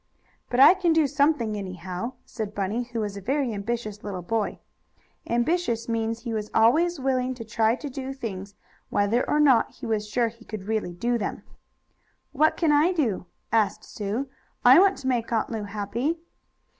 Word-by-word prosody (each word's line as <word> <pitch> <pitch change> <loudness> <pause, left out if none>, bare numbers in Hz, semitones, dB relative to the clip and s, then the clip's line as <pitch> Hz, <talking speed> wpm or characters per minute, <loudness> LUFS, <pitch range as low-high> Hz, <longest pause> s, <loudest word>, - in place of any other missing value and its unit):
"But 245 - 0
I 275 - +10
can 360 -3 +1
do 320 -1 +4
something, 280 -6 +1
anyhow," 185 +3 -5
said 215 -3 -6
Bunny, 205 +5 -1
who 235 -2 -4
was 205 -2 -3
a - - -7
very 265 +3 0
ambitious 215 0 -4
little 190 -4 -5
boy. 220 +3 -1 0.7
Ambitious 240 -1 0
means 230 0 -1
he 235 -2 -4
was 215 -1 -3
always 310 +10 +4
willing 255 -1 0
to 230 -2 -8
try 220 +1 +2
to 290 - -7
do 265 0 -5
things, 200 -7 -6 0.3
whether 210 +5 +2
or 300 - +2
not 270 -6 +4
he - - -9
was 215 -2 -1
sure 235 +1 +1
he 230 +1 -17
could 215 -4 -7
really 215 -5 -2
do 240 +6 0
them. 205 - -4 0.9
"What 310 +2 +2
can 325 -3 +2
I 305 +5 +4
do?" 225 - -1 0.2
asked 215 -3 +1
Sue. 215 +6 -4 0.4
"I 255 +6 +9
want 390 0 +4
to 265 - -6
make 240 -3 0
Aunt 225 0 0
Lu 220 -2 -3
happy." 215 +10 -2
230 Hz, 180 wpm, -25 LUFS, 210-270 Hz, 0.9 s, I